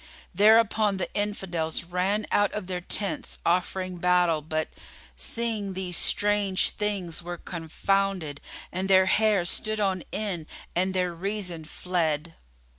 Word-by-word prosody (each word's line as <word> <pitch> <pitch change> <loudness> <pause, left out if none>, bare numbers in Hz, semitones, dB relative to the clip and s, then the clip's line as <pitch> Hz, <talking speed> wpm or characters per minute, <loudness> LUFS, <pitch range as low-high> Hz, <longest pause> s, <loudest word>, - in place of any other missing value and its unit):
Thereupon 215 0 +5
the 190 - -3
Infidels 185 -6 -2
ran 185 +5 0
out 205 -1 +3
of 210 - -3
their 180 -1 -3
tents 200 +3 -1
offering 185 +1 0
battle 175 -2 +3
but, 155 +1 -2 0.5
seeing 220 -4 -3
these 185 -1 -3
strange 205 0 +2
things, 200 -6 -2
were 175 0 -5
confounded 175 -1 -1 0.3
and 185 +2 -2
their 190 -1 +6
hair 210 -2 +3
stood 215 +4 +1
on 190 -3 0
end 185 -7 -3 0.3
and 185 +2 +1
their 180 -1 +1
reason 180 -2 -4
fled. 165 -1 -1
185 Hz, 125 wpm, -27 LUFS, 175-205 Hz, 0.5 s, their